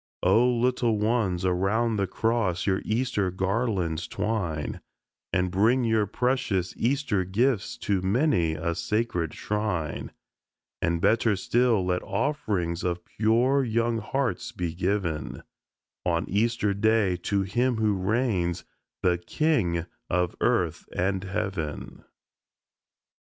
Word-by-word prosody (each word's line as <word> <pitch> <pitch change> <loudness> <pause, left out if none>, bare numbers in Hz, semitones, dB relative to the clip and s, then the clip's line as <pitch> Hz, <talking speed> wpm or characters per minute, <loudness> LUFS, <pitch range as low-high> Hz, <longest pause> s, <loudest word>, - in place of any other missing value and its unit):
O 100 +6 +5
little 120 -2 +1
ones, 105 -5 0
around 100 +5 +1
the 100 -1 0
cross 110 -4 0
your 95 -1 +1
Easter 110 -4 0
garlands 95 -3 -1
twine, 85 -9 -2 0.5
And 90 0 +1
bring 115 +7 +3
your 110 -3 +2
precious 120 -6 0
Easter 125 -5 0
gifts 120 +4 0
to 100 -3 +1
many 95 - +2
a 85 +2 -1
sacred 90 -5 -1
shrine, 100 -8 -2 0.7
And, 85 0 0
better 115 0 +3
still, 115 0 +2
let 90 0 0
offerings 100 - -1
of 85 -1 -2
pure 120 +6 +2
young 115 -1 0
hearts 120 0 -2
be 90 -7 -3
given 90 -4 -2 0.6
On 85 -1 0
Easter 105 0 +1
Day 105 -2 +2
to 100 +3 0
Him 120 +6 +1
who 110 -1 +2
reigns 95 -3 0 0.4
the 90 -1 +2
King 90 - 0 0.2
of 90 0 0
earth - - 0
and 95 +1 0
heaven. 95 -6 -4
100 Hz, 115 wpm, -26 LUFS, 90-115 Hz, 0.7 s, O